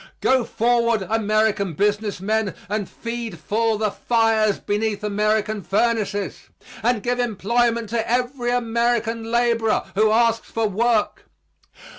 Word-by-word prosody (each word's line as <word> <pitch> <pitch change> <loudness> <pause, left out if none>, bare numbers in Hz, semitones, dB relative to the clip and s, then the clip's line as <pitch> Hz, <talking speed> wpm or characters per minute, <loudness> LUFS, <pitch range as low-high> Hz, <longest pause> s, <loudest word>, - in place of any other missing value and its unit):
Go 260 -2 +3
forward, 235 -2 +1
American 215 -3 +1
business 205 +2 0
men, 215 +1 -1
and 205 -1 -3
feed 230 -5 -6
full 215 +8 0
the 210 -1 0
fires 225 -2 +2
beneath 210 0 -2
American 210 0 0
furnaces; 205 +1 -1 0.3
and 230 -2 +1
give 245 +1 -1
employment 235 0 0
to 230 0 -2
every 245 +1 0
American 235 -1 0
laborer 235 -2 +2
who 215 +2 +3
asks 230 +1 +2
for 225 -1 -1
work. 215 +2 0
225 Hz, 120 wpm, -22 LUFS, 210-235 Hz, 0.3 s, Go